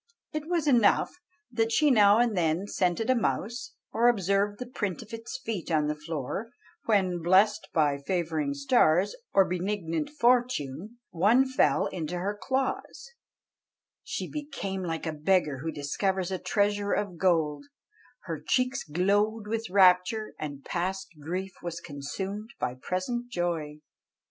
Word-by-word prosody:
It 305 0 -4
was 340 -3 0
enough 245 -7 +4 0.4
that 225 -1 0
she 295 +4 +4
now 205 -3 +6
and 235 -2 +2
then 170 +1 +1
scented 190 +1 0
a - - +3
mouse, 235 +2 -2 0.2
or 235 +2 +3
observed 200 -2 +2
the 250 - -5
print 215 -5 -3
of 225 - -16
its 230 +3 -6
feet 210 -7 -3
on 155 -2 +2
the 150 - 0
floor; 150 - -4 0.4
when, 185 -5 +2
blessed 195 +5 +3
by 145 -3 +2
favouring 170 - -1
stars 245 - +3 0.2
or 195 - +5
benignant 175 -3 -2
fortune, 240 - 0
one 215 +10 +4
fell 260 - +2
into 175 0 -4
her 200 +4 -2
claws 270 - -3 0.9
"She - - -4
became 240 -11 -5
like 165 -2 -3
a 160 - -2
beggar 155 -3 +1
who 160 +4 -3
discovers 185 +6 -1
a 185 - -2
treasure 205 0 +1
of 185 -5 -2
gold; 165 - +1 0.6
Her 160 -4 -5
cheeks 255 - +1
glowed 205 +7 +1
with 225 +1 -3
rapture, 190 +3 +4
and 145 -2 -6
past 190 +2 -2
grief 185 +5 -4
was 170 -1 -5
consumed 190 +9 -6
by 125 - -1
present 185 - -3
joy." 165 -7 -3
195 Hz, 145 wpm, -28 LUFS, 165-225 Hz, 0.9 s, now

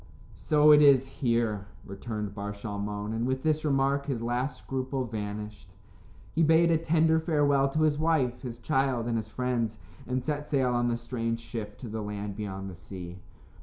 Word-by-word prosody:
"So 150 0 +4
it 150 0 +8
is 135 -3 +6
here," 115 -6 -1 0.2
returned 105 +1 -5
Bar 100 0 -4
Shalmon, 105 0 -4
and 115 +2 -1
with 130 0 -1
this 155 -1 +1
remark 140 -1 +1
his 125 -5 -2
last 120 +4 -1
scruple 130 0 -3
vanished. 105 -3 -6 0.6
He 165 - +1
bade 165 +1 +5
a 165 - +4
tender 160 0 +3
farewell 145 -4 +2
to 155 +3 +1
his 150 -1 +2
wife, 140 -7 +1
his 120 -3 -6
child, 135 -2 0
and 120 -1 -1
his 110 -1 -2
friends, 115 -2 -1 0.3
and 125 0 -1
set 150 +1 -3
sail 130 -4 +2
on 120 0 +1
the 120 -1 0
strange 115 -1 -3
ship 110 -3 -7
to 125 - -8
the 110 0 -4
land 105 -1 -5
beyond 95 -2 -5
the 95 - -8
sea. 90 0 -9
120 Hz, 180 wpm, -28 LUFS, 105-140 Hz, 0.6 s, it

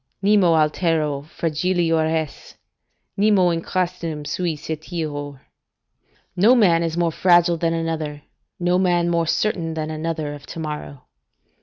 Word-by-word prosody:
"Nemo 200 -5 +4
altero 155 -2 +1
fragilior 165 +1 0
est; 160 -2 -4 0.6
nemo 200 -3 +4
in 165 0 -1
crastinum 165 -4 -3
sui 170 +1 -2
certior." 150 -3 -5 0.9
["No 210 +8 +5
man 180 -8 +4
is 165 0 -2
more 170 -1 +1
fragile 175 0 +4
than 165 0 0
another: 155 -3 -3 0.4
no 180 +1 +2
man 175 -2 +2
more 170 -1 +1
certain 170 -4 -1
than 155 0 -3
another 155 -1 -3
of 145 -1 -11
to - - -8
morrow." 150 -3 -6
165 Hz, 130 wpm, -22 LUFS, 155-175 Hz, 0.9 s, No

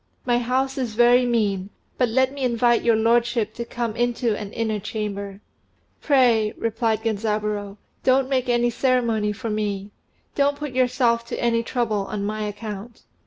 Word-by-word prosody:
My 240 -1 +2
house 260 +3 -1
is 235 -4 -3
very 245 +1 +5
mean, 205 -5 0 0.3
but 250 -2 +3
let 260 +3 +2
me 280 - -7
invite 240 -1 +3
your 230 -1 +3
lordship 230 0 +2
to 235 - -5
come 235 -2 -3
into 240 -1 0
an 205 -1 -6
inner 220 -2 -1
chamber." 200 -2 -5 0.6
"Pray," 240 -7 +3
replied 225 -1 -1
Genzaburô, 210 -2 -2 0.3
"don't 260 0 +3
make 260 -2 0
any 240 0 +2
ceremony 235 -5 +1
for 220 +2 -5
me. 205 -1 -3 0.4
Don't 285 0 +1
put 295 -1 -5
yourself 250 -2 +2
to - - -4
any 230 -1 +2
trouble 220 -4 -1
on 200 -1 -3
my 215 +1 -3
account." 210 +2 -7
230 Hz, 160 wpm, -23 LUFS, 210-245 Hz, 0.6 s, very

